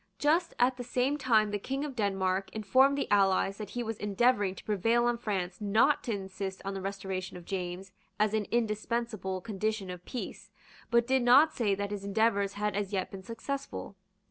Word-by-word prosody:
Just 330 Hz, +4 st, +2 dB
at 250 Hz, +1 st, +3 dB
the 245 Hz, -, -4 dB
same 250 Hz, +3 st, 0 dB
time 220 Hz, -5 st, +3 dB
the 205 Hz, -, -1 dB
King 270 Hz, +7 st, -3 dB
of 280 Hz, -3 st, -6 dB
Denmark 195 Hz, -3 st, 0 dB
informed 260 Hz, +7 st, +3 dB
the -, -, -1 dB
allies 195 Hz, -1 st, +3 dB
that 210 Hz, -2 st, -5 dB
he 240 Hz, +4 st, -3 dB
was 225 Hz, -2 st, -4 dB
endeavouring 205 Hz, -1 st, +2 dB
to -, -, -11 dB
prevail 225 Hz, +4 st, +2 dB
on 240 Hz, 0 st, +2 dB
France 190 Hz, -4 st, -3 dB
not 220 Hz, +8 st, +3 dB
to 235 Hz, -, -1 dB
insist 190 Hz, -1 st, -4 dB
on 195 Hz, -, -2 dB
the 195 Hz, -, -4 dB
restoration 190 Hz, -1 st, -4 dB
of 175 Hz, -, -12 dB
James 185 Hz, 0 st, -4 dB, 0.3 s
as 210 Hz, 0 st, +2 dB
an 215 Hz, -2 st, 0 dB
indispensable 220 Hz, -3 st, -1 dB
condition 215 Hz, -2 st, -2 dB
of 180 Hz, -1 st, -8 dB
peace, 250 Hz, -, -6 dB, 0.4 s
but 235 Hz, -1 st, +4 dB
did 260 Hz, +1 st, +2 dB
not 270 Hz, +6 st, +6 dB
say 210 Hz, -5 st, +1 dB
that 200 Hz, +1 st, -3 dB
his 205 Hz, -1 st, -4 dB
endeavours 200 Hz, -1 st, +1 dB
had 210 Hz, -1 st, -2 dB
as 205 Hz, -1 st, -2 dB
yet 190 Hz, -2 st, -2 dB
been 195 Hz, -, -7 dB
successful. 230 Hz, +1 st, -5 dB
210 Hz, 195 wpm, -30 LUFS, 195-240 Hz, 0.4 s, not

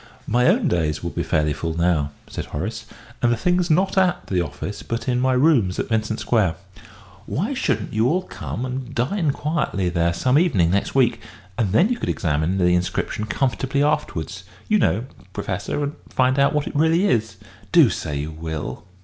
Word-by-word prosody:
"My 125 Hz, +2 st, +2 dB
own 200 Hz, +3 st, +3 dB
days 80 Hz, -, 0 dB
will -, -, -3 dB
be -, -, -2 dB
fairly 75 Hz, -1 st, +1 dB
full 80 Hz, +2 st, -4 dB
now," 85 Hz, -4 st, +2 dB, 0.2 s
said -, -, -6 dB
Horace; -, -, -5 dB, 0.3 s
"and 120 Hz, -, +3 dB
the 120 Hz, -, +1 dB
thing's 180 Hz, +6 st, +1 dB
not 190 Hz, +4 st, +3 dB
at 180 Hz, -1 st, +1 dB
the 90 Hz, -2 st, 0 dB
office, 95 Hz, +4 st, -5 dB
but 115 Hz, +1 st, -4 dB
in 125 Hz, -1 st, +1 dB
my 130 Hz, +1 st, +2 dB
rooms 125 Hz, -, +3 dB
at -, -, -2 dB
Vincent 110 Hz, -1 st, 0 dB
Square. 100 Hz, -9 st, +1 dB, 0.7 s
Why -, -, -1 dB
shouldn't -, -, -1 dB
you 110 Hz, +2 st, +2 dB
all 180 Hz, +7 st, +1 dB
come 125 Hz, -8 st, -5 dB
and 130 Hz, 0 st, -5 dB
dine 150 Hz, +7 st, 0 dB
quietly 140 Hz, -, -1 dB
there 85 Hz, -1 st, +1 dB
some 130 Hz, -, +2 dB
evening 100 Hz, -, +2 dB
next 100 Hz, +6 st, 0 dB
week, 120 Hz, -4 st, +3 dB, 0.3 s
and 105 Hz, -3 st, 0 dB
then 175 Hz, -, +4 dB
you 245 Hz, -1 st, -1 dB
could -, -, -2 dB
examine 80 Hz, +2 st, 0 dB
the 90 Hz, -1 st, +3 dB
inscription 90 Hz, +4 st, -1 dB
comfortably 135 Hz, +4 st, 0 dB
afterwards, 95 Hz, -, -1 dB, 0.2 s
you 215 Hz, -1 st, +3 dB
know, 110 Hz, -, +1 dB, 0.3 s
Professor, 100 Hz, +7 st, -3 dB
and 145 Hz, +1 st, -3 dB
find 130 Hz, +1 st, +2 dB
out 140 Hz, -, +4 dB
what 150 Hz, -1 st, 0 dB
it -, -, -6 dB
really 160 Hz, +5 st, +3 dB
is? 115 Hz, -, +1 dB, 0.4 s
Do -, -, +6 dB
say 75 Hz, -2 st, -3 dB
you 75 Hz, +2 st, -4 dB
will." 80 Hz, -1 st, -5 dB
115 Hz, 190 wpm, -22 LUFS, 90-145 Hz, 0.7 s, Do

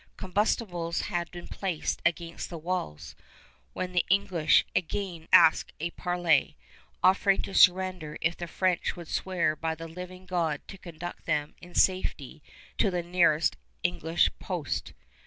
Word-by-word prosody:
Combustibles 185 Hz, -3 st, -1 dB
had 175 Hz, -3 st, -2 dB
been 175 Hz, -1 st, -9 dB
placed 185 Hz, -5 st, -3 dB
against 170 Hz, -1 st, -4 dB
the 170 Hz, -, -6 dB
walls, 155 Hz, -, -4 dB, 0.6 s
when 185 Hz, 0 st, -3 dB
the 180 Hz, -1 st, +2 dB
English 190 Hz, -4 st, +3 dB
again 175 Hz, -2 st, -2 dB
asked 160 Hz, -, +6 dB
a 170 Hz, +2 st, -2 dB
parley, 175 Hz, -5 st, +1 dB, 0.5 s
offering 195 Hz, +1 st, +4 dB
to 195 Hz, -, -6 dB
surrender 185 Hz, -5 st, +3 dB
if 165 Hz, +1 st, 0 dB
the 175 Hz, -, -6 dB
French 185 Hz, +1 st, 0 dB
would 170 Hz, -2 st, -9 dB
swear 180 Hz, -4 st, 0 dB
by 160 Hz, 0 st, -2 dB
the 165 Hz, +1 st, -8 dB
living 180 Hz, +2 st, -9 dB
God 170 Hz, -5 st, -1 dB
to 195 Hz, -, -9 dB
conduct 175 Hz, 0 st, -8 dB
them 150 Hz, 0 st, 0 dB
in 175 Hz, 0 st, -13 dB
safety 160 Hz, -6 st, +1 dB, 0.4 s
to 205 Hz, -, +4 dB
the 180 Hz, -2 st, -2 dB
nearest 170 Hz, -3 st, +3 dB, 0.3 s
English 160 Hz, -, +1 dB
post. 175 Hz, -7 st, -3 dB
175 Hz, 140 wpm, -28 LUFS, 160-185 Hz, 0.6 s, asked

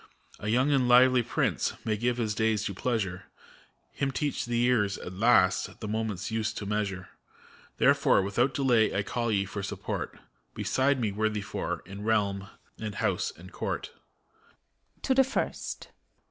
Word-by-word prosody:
A 100 Hz, -, -5 dB
young 125 Hz, +6 st, +3 dB
and 135 Hz, -3 st, +3 dB
lively 125 Hz, +1 st, +6 dB
Prince -, -, 0 dB
may 110 Hz, -, +1 dB
give 120 Hz, +3 st, 0 dB
his 110 Hz, -3 st, -1 dB
days 110 Hz, -1 st, +1 dB
to 100 Hz, -, -2 dB
pleasure; 100 Hz, -4 st, -2 dB, 0.7 s
Him 135 Hz, -, -1 dB
teach 145 Hz, +1 st, -2 dB
the 120 Hz, 0 st, +2 dB
years^ 105 Hz, -6 st, +2 dB
at 90 Hz, -, -6 dB
last, 95 Hz, -3 st, +3 dB
the 110 Hz, -, -5 dB
moment's 110 Hz, -2 st, -2 dB
use 110 Hz, -1 st, 0 dB
to 105 Hz, -, -5 dB
measure. 100 Hz, -3 st, -2 dB, 0.7 s
Therefore, -, -, +4 dB
without 120 Hz, +7 st, +1 dB
delay, 120 Hz, -7 st, +3 dB
I 100 Hz, -, +1 dB
call 120 Hz, +2 st, -2 dB
ye, 100 Hz, -2 st, +1 dB
for 100 Hz, +1 st, -5 dB
support. 100 Hz, -, -4 dB, 0.4 s
Beside 135 Hz, +1 st, +1 dB
me, 110 Hz, -4 st, 0 dB
worthy 105 Hz, +1 st, -1 dB
Four, 100 Hz, -, -4 dB
in 100 Hz, +2 st, -9 dB
realm 100 Hz, -3 st, 0 dB, 0.3 s
and 105 Hz, -2 st, -5 dB
house -, -, 0 dB
and 90 Hz, +3 st, -12 dB
court. -, -, -4 dB, 1.1 s
{To 265 Hz, -, +2 dB
the 265 Hz, +1 st, +6 dB
First.) 265 Hz, -, -3 dB
110 Hz, 160 wpm, -28 LUFS, 100-120 Hz, 1.1 s, lively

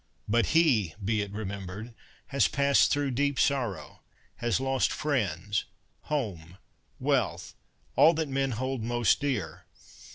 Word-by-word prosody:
But 115 Hz, +2 st, +2 dB
he, 115 Hz, -, +3 dB
be 110 Hz, 0 st, +1 dB
it 100 Hz, -1 st, -5 dB
remembered, 100 Hz, +1 st, -6 dB, 0.4 s
has 140 Hz, -6 st, +3 dB
passed 140 Hz, 0 st, +3 dB
through 145 Hz, -2 st, 0 dB
deep 140 Hz, +2 st, 0 dB
sorrow, 125 Hz, -, -1 dB, 0.4 s
has 120 Hz, 0 st, 0 dB
lost 135 Hz, 0 st, +1 dB
friends, 105 Hz, -, -1 dB, 0.4 s
home, 95 Hz, -, -3 dB, 0.4 s
wealth -, -, 0 dB, 0.2 s
— -, -, -38 dB
all 165 Hz, +2 st, +6 dB
that 160 Hz, -1 st, -1 dB
men 135 Hz, -1 st, -1 dB
hold 130 Hz, +2 st, -3 dB
most 120 Hz, 0 st, +2 dB
dear. 105 Hz, -, -3 dB
120 Hz, 130 wpm, -28 LUFS, 100-140 Hz, 0.4 s, all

